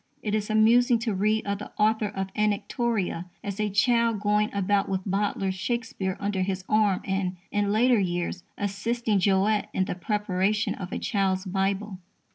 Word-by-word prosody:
It 210 Hz, -, -2 dB
is 215 Hz, 0 st, -1 dB
amusing 235 Hz, +3 st, +5 dB
to 230 Hz, -3 st, -1 dB
read 215 Hz, +3 st, +1 dB
of 200 Hz, 0 st, -2 dB
the 210 Hz, -, -8 dB
author 215 Hz, 0 st, +2 dB
of 195 Hz, -1 st, -4 dB
Anactoria 210 Hz, -3 st, -1 dB, 0.2 s
as 200 Hz, 0 st, -5 dB
a 210 Hz, 0 st, +1 dB
child 230 Hz, +2 st, +2 dB
going 210 Hz, +1 st, +1 dB
about 200 Hz, 0 st, +1 dB
with 190 Hz, -1 st, -1 dB
Bowdler's 195 Hz, -1 st, 0 dB
Shakespeare 195 Hz, -2 st, -3 dB
under 200 Hz, -2 st, -1 dB
his 185 Hz, 0 st, -2 dB
arm 210 Hz, -3 st, +2 dB
and, 190 Hz, -1 st, -1 dB, 0.2 s
in 205 Hz, -1 st, +1 dB
later 235 Hz, +2 st, +4 dB
years, 175 Hz, -1 st, -2 dB
assisting 210 Hz, +2 st, -1 dB
Jowett 200 Hz, +2 st, +2 dB
in 190 Hz, -, +2 dB
the -, -, -3 dB
preparation 205 Hz, +2 st, 0 dB
of 185 Hz, -1 st, -7 dB
a -, -, -2 dB
_Child's 190 Hz, -2 st, 0 dB
Bible. 195 Hz, +1 st, -1 dB
205 Hz, 165 wpm, -26 LUFS, 190-215 Hz, 0.2 s, amusing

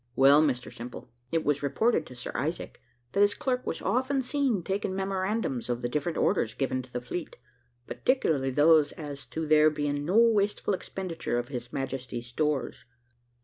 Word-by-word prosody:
Well, 140 Hz, +3 st, +7 dB
Mr 130 Hz, -5 st, -1 dB
Simple, 120 Hz, 0 st, -9 dB, 0.2 s
it 165 Hz, -1 st, 0 dB
was 145 Hz, -1 st, +1 dB
reported 160 Hz, -, +1 dB
to 125 Hz, -, -11 dB
Sir 125 Hz, -, -6 dB
Isaac 155 Hz, +7 st, -3 dB, 0.3 s
that -, -, -1 dB
his 205 Hz, 0 st, +4 dB
clerk 255 Hz, -1 st, -2 dB
was -, -, -3 dB
often 260 Hz, +2 st, +1 dB
seen 250 Hz, -, 0 dB
taking 190 Hz, +1 st, -2 dB
memorandums 190 Hz, -, -2 dB
of 120 Hz, 0 st, -2 dB
the 120 Hz, -, 0 dB
different 155 Hz, +5 st, -2 dB
orders 110 Hz, -1 st, +1 dB
given 130 Hz, -1 st, -1 dB
to 125 Hz, -1 st, -15 dB
the 125 Hz, -, -2 dB
fleet, 160 Hz, +7 st, -6 dB, 0.5 s
particularly 155 Hz, -, +1 dB
those 150 Hz, +2 st, +4 dB
as 145 Hz, -3 st, -8 dB
to 160 Hz, 0 st, -4 dB
there 155 Hz, 0 st, +6 dB
being 145 Hz, -1 st, -2 dB
no 180 Hz, +8 st, +1 dB
wasteful 210 Hz, -3 st, +3 dB
expenditure 185 Hz, -8 st, -3 dB
of 120 Hz, +2 st, -3 dB
His 120 Hz, -3 st, -6 dB
Majesty's 130 Hz, -3 st, -4 dB
stores. 140 Hz, +2 st, -2 dB
150 Hz, 170 wpm, -28 LUFS, 130-195 Hz, 0.5 s, Well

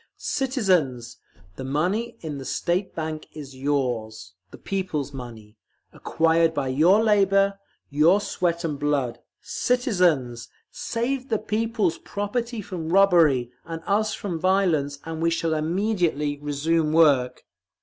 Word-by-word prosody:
CITIZENS! 180 Hz, -, 0 dB, 0.4 s
The -, -, -6 dB
money 185 Hz, -, -1 dB
in 150 Hz, -4 st, -5 dB
the -, -, -7 dB
State 175 Hz, +8 st, -2 dB
Bank 155 Hz, -1 st, -4 dB
is 140 Hz, -3 st, -9 dB
yours, 120 Hz, -7 st, -2 dB, 0.2 s
the -, -, -12 dB
people's 180 Hz, -8 st, -3 dB
money, 115 Hz, -4 st, -10 dB, 0.4 s
acquired 165 Hz, 0 st, +1 dB
by 135 Hz, -2 st, -1 dB
your 170 Hz, +11 st, +4 dB
labour, 195 Hz, -2 st, +3 dB, 0.3 s
your 160 Hz, +7 st, +4 dB
sweat 170 Hz, -4 st, -2 dB
and 150 Hz, -4 st, -3 dB
blood. 140 Hz, -5 st, -1 dB, 0.2 s
CITIZENS! 180 Hz, -, 0 dB, 0.2 s
Save 255 Hz, +3 st, -3 dB
the 220 Hz, -, +1 dB
people's 215 Hz, -5 st, -1 dB
property 225 Hz, +2 st, -3 dB
from 170 Hz, -4 st, -6 dB
robbery, 165 Hz, -10 st, +4 dB
and 165 Hz, 0 st, -7 dB
us 215 Hz, +2 st, +1 dB
from 175 Hz, -5 st, -4 dB
violence, 170 Hz, -6 st, +1 dB
and 160 Hz, 0 st, -5 dB
we 165 Hz, -, +3 dB
shall 165 Hz, -1 st, 0 dB
immediately 160 Hz, -3 st, 0 dB
resume 150 Hz, +2 st, 0 dB
work. 140 Hz, -6 st, +3 dB
165 Hz, 125 wpm, -24 LUFS, 145-195 Hz, 0.4 s, your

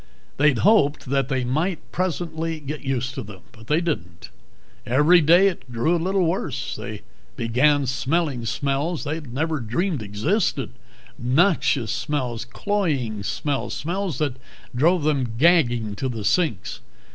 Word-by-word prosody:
They'd 145 Hz, -3 st, +4 dB
hoped 190 Hz, -, +3 dB
that 135 Hz, -2 st, +1 dB
they 130 Hz, -2 st, 0 dB
might, 155 Hz, +9 st, 0 dB
presently, 165 Hz, -3 st, -2 dB
get 150 Hz, +1 st, -6 dB
used 130 Hz, -1 st, -2 dB
to 135 Hz, -, -5 dB
them. 100 Hz, -5 st, -10 dB, 0.3 s
They 155 Hz, +5 st, +2 dB
didn't. 90 Hz, -, -4 dB, 0.5 s
Every 150 Hz, +8 st, +5 dB
day 175 Hz, +6 st, +6 dB
it 130 Hz, -9 st, -4 dB
grew 120 Hz, +9 st, +1 dB
a 170 Hz, -, -1 dB
little 190 Hz, +1 st, +1 dB
worse. 165 Hz, -7 st, -2 dB
They 110 Hz, -4 st, -7 dB, 0.3 s
began 135 Hz, +5 st, +2 dB
smelling 135 Hz, 0 st, -1 dB
smells 140 Hz, +6 st, -1 dB
they 155 Hz, +2 st, -3 dB
never 150 Hz, +3 st, -2 dB
dreamed 135 Hz, -, -1 dB
existed 130 Hz, -, -1 dB, 0.5 s
noxious 135 Hz, -, +2 dB
smells, 120 Hz, -1 st, -2 dB
cloying 135 Hz, -, -1 dB
smells, 140 Hz, +7 st, -2 dB
smells 180 Hz, +2 st, -3 dB
that 145 Hz, -5 st, -1 dB, 0.4 s
drove 165 Hz, +6 st, +3 dB
them 135 Hz, -6 st, 0 dB
gagging 120 Hz, -9 st, +3 dB
to 130 Hz, -, -2 dB
the 110 Hz, -4 st, -5 dB
sinks. 115 Hz, -, 0 dB
145 Hz, 135 wpm, -23 LUFS, 120-165 Hz, 0.5 s, day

